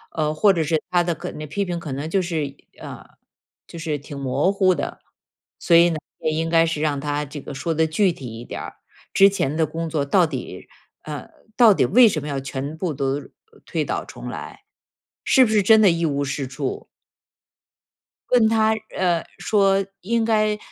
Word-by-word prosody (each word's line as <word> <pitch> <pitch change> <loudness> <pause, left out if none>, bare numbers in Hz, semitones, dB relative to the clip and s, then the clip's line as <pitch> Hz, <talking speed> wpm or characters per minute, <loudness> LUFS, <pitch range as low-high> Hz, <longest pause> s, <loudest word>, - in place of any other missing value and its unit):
呃， 155 -1 0
或 195 +6 +4
者 165 -3 0
是 155 0 0
他 175 -1 +2
的 170 0 -1
可 - - -7
那 155 - -7
批 200 +7 -2
评 175 -2 -3
可 170 -4 -6
能 140 +4 -4
就 195 +3 +1
是， 160 -6 -3 0.2
呃， - - -9 0.6
就 - - -10
是 155 -2 -2
挺 145 0 -10
模 135 +6 0
糊 195 -2 +3
的。 150 - -5 0.6
所 170 - +3
以 170 +1 +7
呢， 165 - -2 0.2
也 155 - -1
应 165 +1 -1
该 165 0 +4
是 165 -2 -2
让 150 -2 0
他 145 0 -2
这 145 +1 -8
个 140 - -8
说 145 +5 -2
得 160 +1 +2
具 175 +4 +1
体 135 -6 -9
一 120 - -9
点 - - -6
儿， - - -8 0.4
之 195 0 +7
前 150 -8 -1
的 160 - +3
工 165 +1 -4
作 150 -3 -1
到 175 +5 +4
底 135 -6 -7 0.3
呃， 150 -2 -7 0.3
到 230 -4 +7
底 - - +2
为 240 +3 +6
什 165 -8 -1
么 150 - -6
要 140 -1 -2
全 135 +3 -5
部 170 -1 -2
都 140 0 -2 0.4
推 - - -2
倒 - - -3
重 - - -9
来， - - -8 0.6
是 265 - +5
不 220 - -2
是 215 -1 +4
真 220 +3 +6
的 205 - +6
一 165 0 0
无 145 -2 0
是 135 -1 -3
处？ 135 +1 -5 1.4
问 240 -3 +5
他， 220 0 +3 0.2
呃， 175 -3 +1 0.2
说 195 -2 +2 0.2
应 230 +4 0
该 215 -1 +2
165 Hz, 215 characters per minute, -22 LUFS, 145-195 Hz, 1.4 s, 以